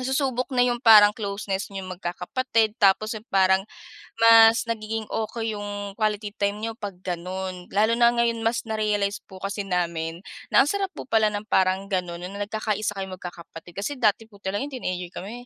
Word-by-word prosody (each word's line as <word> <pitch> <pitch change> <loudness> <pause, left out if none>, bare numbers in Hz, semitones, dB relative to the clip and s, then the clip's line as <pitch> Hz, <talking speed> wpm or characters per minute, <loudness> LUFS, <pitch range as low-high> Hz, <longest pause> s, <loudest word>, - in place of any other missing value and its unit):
nasusubok 260 -1 -1
na 245 - +4
yung 240 -1 0
parang 215 -3 +9
closeness 200 -2 -3
niyong 190 -1 -6
magkakapatid. 220 +5 -1
Tapos 200 +2 +4
yung 220 +1 -9
parang 190 0 +3 0.6
mas 230 0 +7
nagiging 220 -1 -3 0.2
okey 225 -1 -3
yung 205 -1 -5
quality 210 -1 -1
time 200 0 0
niyo 225 +1 -3
'pag 200 -5 -6
gan'on. 185 +1 -4
Lalo 215 +3 +3
na 235 0 +6
ngayon 235 -1 +1
mas 230 +1 +1
narealize 210 -2 -1
po 190 - -11
kasi 200 +1 -3
namin 170 -2 -2 0.3
na - - +7
ang - - -2
sarap 395 +1 -1
po - - -6
pala 220 -1 +3
ng 205 +1 -4
parang 190 +1 +2
gano'n 180 -3 -2
na 200 +2 -4
nagkakaisa 215 -1 -2
kayong 190 -1 -5
magkakapatid. 175 -1 -11
Kasi 205 +9 -2
dati 225 -2 +2
po 205 - -17
talaga 200 +8 -2
no'ng 290 - -9
teenager 180 -8 -4
kami 235 +6 -8
205 Hz, 180 wpm, -25 LUFS, 190-225 Hz, 0.6 s, parang